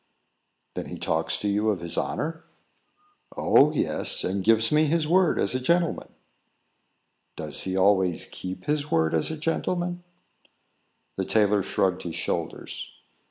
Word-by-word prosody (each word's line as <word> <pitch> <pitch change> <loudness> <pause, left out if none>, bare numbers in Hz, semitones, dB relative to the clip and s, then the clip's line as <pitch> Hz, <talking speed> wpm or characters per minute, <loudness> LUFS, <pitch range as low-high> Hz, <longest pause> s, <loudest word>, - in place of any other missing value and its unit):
"Then, - - -5
he - - -7
talks 80 0 -1
to 105 - -3
you 105 +2 +1
of 100 -4 -1
his 85 -1 -2
honour?" 160 +1 -3 0.9
"Oh, 150 +2 +5
yes; 155 - 0
and 95 +1 -2
gives 115 +2 +3
me 155 +1 +4
his 160 0 +1
word 180 +1 +3
as - - +1
a 130 - 0
gentleman." 170 +5 0 1.3
"Does - - -1
he 95 0 -2
always 95 -2 +3
keep 95 0 -7
his 150 0 -1
word 80 0 +1
as 80 - +1
a 160 - -4
gentleman?" 175 +2 -2 1.1
The - - -1
tailor 105 -2 +3
shrugged 95 -1 0
his 85 -2 -6
shoulders. - - -4
110 Hz, 145 wpm, -25 LUFS, -, 1.3 s, Oh